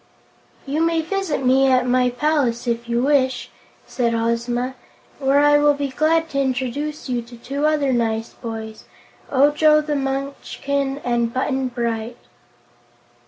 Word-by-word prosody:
"You 290 +3 -1
may 330 0 +2
visit 340 -6 -2
me 265 +1 +4
at 255 -1 +3
my 250 0 +2
palace, 250 -2 0
if 235 0 -2
you 235 +1 +1
wish," 260 -3 +1 0.3
said 235 -2 -1
Ozma, 235 +2 -1 0.5
"where 270 0 +2
I 290 0 +5
will 290 0 +4
be 285 -1 -2
glad 320 +4 +1
to 275 -1 0
introduce 270 +4 -2
you 245 -2 -1
to 235 +1 -13
two 280 +5 -2
other 295 -4 +1
nice 225 -1 -1
boys, 220 -1 -7 0.4
Ojo 295 +3 +4
the 300 -1 -2
Munchkin 275 0 -2
and 235 -1 0
Button 265 +1 -1
Bright." 235 -1 -3
265 Hz, 140 wpm, -21 LUFS, 240-290 Hz, 0.5 s, I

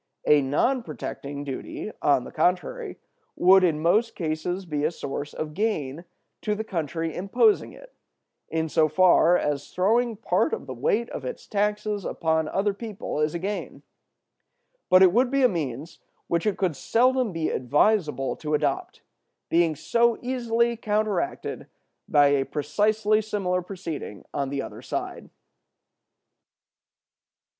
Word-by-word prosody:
A 150 -1 +5
non 195 - +1
protecting 145 -5 -6
duty, 140 +9 -6
on 140 -4 +3
the - - -9
contrary, 185 - -1 0.4
would 190 +1 +6
in 160 -4 +2
most 210 +9 +2
cases 175 +3 -3
be 150 -3 -2
a 155 - +3
source 145 -3 -5
of 155 -1 -5
gain 170 -6 -2 0.4
to 210 -1 -1
the 220 - -3
country 165 -4 -3
imposing 400 - +2
it, - - -15 0.6
in 160 0 -1
so 155 0 +3
far 180 +1 +5
as 145 -3 -2
throwing 225 +5 +2
part 195 -3 0
of - - -3
the 130 - -6
weight 210 - 0
of - - -6
its - - -6
taxes 210 0 -1
upon 160 -2 0
other 200 +4 0
people 205 -6 -5
is 150 +2 0
a - - +1
gain; 200 +4 -5 1.1
but 185 +1 +7
it 180 -2 +6
would 245 +3 +3
be 275 0 +1
a - - +8
means 155 - -4 0.3
which 170 +4 -1
it 210 - 0
could 180 -6 0
seldom 250 - +2
be 165 -2 -2
advisable 145 - +1
to 150 -1 -1
adopt, 145 -2 -2 0.5
being 165 -2 +3
so 235 +8 +2
easily 235 -2 0
counteracted 215 - -2 0.4
by 145 -1 +5
a 140 -1 +2
precisely 210 +10 +1
similar 195 -4 -1
proceeding 175 - -7
on 140 -1 -1
the 140 -1 -2
other - - -9
side. - - -5
180 Hz, 145 wpm, -25 LUFS, 150-215 Hz, 1.1 s, a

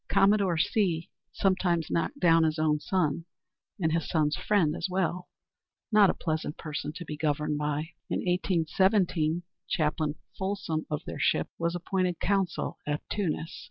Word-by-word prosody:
Commodore 195 -3 +4
C 170 -1 +1 0.2
sometimes 180 -4 +1
knocked 285 - -1
down 165 -6 +5
his 160 0 +1
own 155 -1 +2
son, 165 -1 0 0.5
and 160 -3 +1
his 165 -1 0
son's 150 -2 +2
friend 180 -8 +2
as 175 - -2
well, 180 -1 -1 0.6
not 210 -3 +6
a - - +1
pleasant 155 -2 -2
person 150 -1 -4
to 175 +2 -7
be 150 - -5
governed 150 -1 0
by. 150 +1 -1 0.2
In - - 0
1817, 175 -1 +2 0.2
Chaplain 155 -2 0 0.2
Folsom 190 -5 -2
of 150 +2 -3
their - - -6
ship - - +2
was 170 +1 0
appointed 180 0 -1
consul 195 -2 0
at 145 0 -2
Tunis. 170 -5 -2
170 Hz, 150 wpm, -29 LUFS, 155-190 Hz, 0.6 s, not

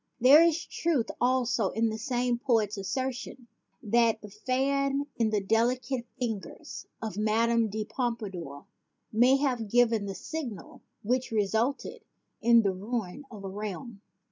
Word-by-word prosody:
There 270 +6 +8
is 335 -1 +2
truth 300 -9 0
also 245 -4 +2
in 225 0 0
the 220 - -4
same 245 0 0
poet's 225 -5 +1
assertion 255 +4 -4 0.4
that 225 +1 +3
the 210 - -10
fan 275 +5 0
in 225 -2 +2
the 210 -2 0
delicate 240 +4 0
fingers 225 -6 -5 0.2
of 215 -3 -4
Madame 225 +1 +2
de 215 +1 -3
Pompadour 210 - -4 0.5
may 250 +5 +5
have 250 -6 -1
given 230 -3 +3
the 195 - -5
signal 245 - -6 0.2
which 250 +4 0
resulted 220 +5 -1 0.4
in 235 0 +6
the 195 -2 +1
ruin 210 +5 -4
of 210 -4 -10
a - - -4
realm. 210 +2 -6
230 Hz, 140 wpm, -28 LUFS, 210-255 Hz, 0.5 s, There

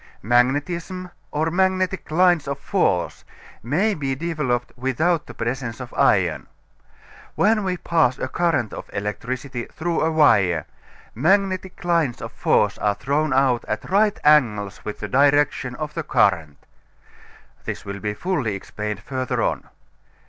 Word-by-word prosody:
Magnetism 145 - 0 0.2
or 160 +2 -1
magnetic 185 +1 0
lines 175 -1 +3
of 140 0 -2
force 140 - 0 0.4
may 180 - +1
be 135 -6 -2
developed 135 -6 -2
without 150 +6 0
the - - -10
presence 120 0 -3
of 125 -2 -8
iron. - - +2 0.9
When 215 +1 +3
we 185 -1 -1
pass 160 -8 +1
a 130 - -3
current 145 -7 0
of - - -8
electricity 120 +5 -4
through 170 +1 -2
a 160 - +2
wire, 100 - +3 0.5
magnetic 190 - 0
lines 165 -8 +1
of - - -7
force - - +1
are 105 -1 +1
thrown 145 +7 0
out 130 -2 +2
at 110 +10 -4
right 205 +1 +3
angles 110 -10 +3
with 105 - -6
the 105 - -3
direction 140 0 +2
of 150 0 -5
the 165 - -2
current. 85 - +1 1.1
This - - -5
will 100 0 -6
be 105 +1 -3
fully 145 - -1
explained 105 +1 -5
further 130 +3 -2
on. - - -2
140 Hz, 140 wpm, -22 LUFS, 115-170 Hz, 1.1 s, lines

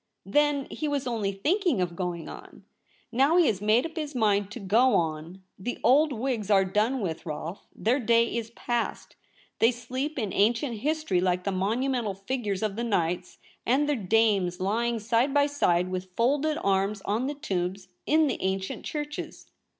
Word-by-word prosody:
Then 290 +6 +2
he 310 - -3
was 285 -2 -1
only 225 -5 -1
thinking 315 - +1
of 175 -2 -1
going 175 -2 -4
on. - - -11 0.5
Now 275 +8 +3
he 350 - +6
has 200 -8 0
made 215 +5 +3
up 325 - -7
his 300 -3 -4
mind 205 -4 +2
to 210 - -8
go 230 +6 +3
on. 165 +3 -2 0.2
The 245 +6 -4
old 295 +4 +5
Whigs 235 -4 -2
are 195 -2 +5
done 215 +7 0
with, 165 -5 -3
Rolfe; 165 +4 -6
their 245 +6 +1
day 235 -1 +2
is 230 -1 -3
past; 240 0 -3 0.4
they 230 - +5
sleep 255 +5 -4
in 215 -7 -2
ancient 230 +4 +1
history 295 - 0
like 180 0 +1
the 200 - -1
monumental 220 +3 -1
figures 205 -1 -3
of 210 -1 -2
the 235 - -1
knights 180 -6 -1 0.3
and 270 +5 +2
their 295 - +2
dames 200 -4 +2
lying 230 +5 0
side 235 +5 +1
by 285 0 +5
side 185 -11 +1
with 185 0 -4
folded 290 +6 +1
arms 195 +1 +1
on 225 +6 0
the 290 - -3
tombs 190 -8 -3 0.2
in 310 +1 +4
the 275 - -2
ancient 190 0 -2
churches. 295 0 -6
225 Hz, 175 wpm, -27 LUFS, 195-270 Hz, 0.5 s, he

